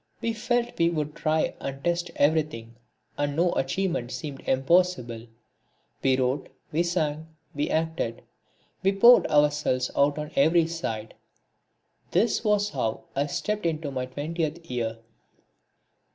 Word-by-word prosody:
We 230 - -1
felt 240 +1 -1
we 170 0 +4
would 150 -3 -2
try 155 +1 0
and 135 0 -6
test 175 0 0
everything, 145 -6 +1 0.5
and 145 0 0
no 170 +2 +3
achievement 135 -2 -1
seemed 145 -4 -6
impossible. 135 -5 +1 0.7
We 130 -1 +3
wrote, 130 +2 -1 0.2
we 160 - +1
sang, 160 -3 -1 0.3
we 145 +1 -1
acted, 160 -7 -1 0.6
we 195 +1 +2
poured 235 +5 +7
ourselves 145 -3 +2
out 140 +1 +3
on 150 0 -5
every 160 +4 +4
side. 115 -10 -4 1.0
This 230 0 +2
was 210 -1 +2
how 115 -6 -2
I 140 +2 +1
stepped 210 +4 -2
into 155 -3 -2
my 130 -1 -3
twentieth 160 +4 -4
year. 115 -2 -2
150 Hz, 130 wpm, -26 LUFS, 135-175 Hz, 1.0 s, poured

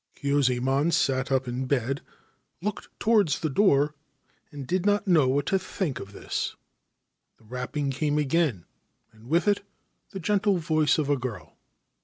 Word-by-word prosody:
Kyuzaemon 140 +1 +1
sat 135 -3 +1
up 130 -1 +1
in 125 +2 -3
bed, 135 0 0 0.6
looked 210 +3 -4
towards 210 -9 +3
the 155 - -1
door, 150 -5 +3 0.6
and 145 -2 -7
did 180 +6 0
not 205 0 +1
know 160 -7 +5
what 140 +2 +1
to 195 - +1
think 180 -5 -3
of 100 - -9
this. - - -3 0.8
The - - -25
rapping 125 +5 -3
came 150 +2 0
again, 150 - +1 0.5
and 110 +1 -18
with 170 +7 +2
it 205 -1 +2 0.5
the 195 - -7
gentle 200 +1 +2
voice 155 -3 +2
of 155 -3 0
a 145 -1 +2
girl. 115 -10 -6
145 Hz, 155 wpm, -26 LUFS, 130-170 Hz, 0.8 s, know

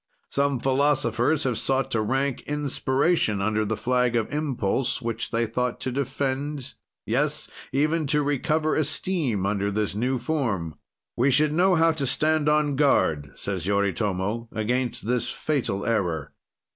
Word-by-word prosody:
Some 140 -2 +1
philosophers 135 +1 +2
have 125 -4 0
sought 135 0 0
to 110 - +1
rank 135 +4 0
inspiration 145 - +1
under 110 +2 +1
the 110 +1 -2
flag 125 +1 +1
of 115 +4 -1
impulse, 130 -4 0
which 115 -2 -3
they 115 +1 0
thought 125 +2 -2
to 130 - -2
defend; 140 +1 -2 0.3
yes, 145 +6 0 0.2
even 155 +3 +1
to 150 +1 +2
recover 155 +2 +1
esteem 150 - -1
under 100 0 0
this 105 -1 -1
new 125 +5 0
form. 115 - -2 0.4
"We 130 +4 +3
should 150 +3 +3
know 180 +3 +4
how 165 0 +4
to 145 -4 -2
stand 155 +3 +2
on 150 -2 +2
guard," 80 - +2
says 95 -3 -3
Yoritomo, 100 +2 -1
"against 120 +1 -1
this 125 +1 0
fatal 130 -10 -2
error." 85 -10 -1
130 Hz, 145 wpm, -25 LUFS, 110-145 Hz, 0.4 s, know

